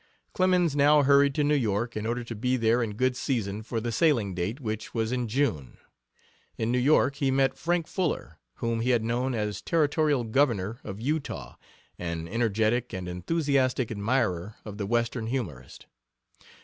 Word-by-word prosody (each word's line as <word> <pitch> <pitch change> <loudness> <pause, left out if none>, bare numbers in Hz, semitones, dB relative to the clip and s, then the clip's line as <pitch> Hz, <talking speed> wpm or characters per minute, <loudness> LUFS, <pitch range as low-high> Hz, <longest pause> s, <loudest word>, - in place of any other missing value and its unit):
Clemens 180 -4 +2
now 145 +1 +5
hurried 140 0 +4
to 150 - +2
New 145 +1 +2
York 120 -3 0
in 110 0 -3
order 120 +1 -2
to 115 - -6
be 125 +4 0
there 115 +1 +2
in 110 -3 -2
good 130 +2 +1
season 110 -6 -2
for 115 +1 -3
the 120 +1 -3
sailing 115 - +2
date, 90 +9 -3
which 110 -4 -5
was 115 0 0
in 125 -1 -1
June. 110 - -1 0.8
In 110 +1 -1
New 125 - +2
York 140 +1 +3
he 140 -2 +1
met 135 0 +2
Frank 175 -1 0
Fuller, 180 0 -3 0.2
whom 115 -1 -2
he 125 - 0
had 120 -3 +3
known 120 +3 -1
as 105 -2 -2
territorial 150 -4 +1
Governor 115 -3 +1
of 100 0 -7
Utah, 145 +5 -3 0.4
an 85 -1 -4
energetic 115 +3 0
and 90 -1 -4
enthusiastic 130 - 0
admirer 100 -3 -1
of 105 -1 -8
the 100 - -2
Western 115 0 0
humorist. 90 - -5
120 Hz, 170 wpm, -27 LUFS, 110-140 Hz, 0.8 s, now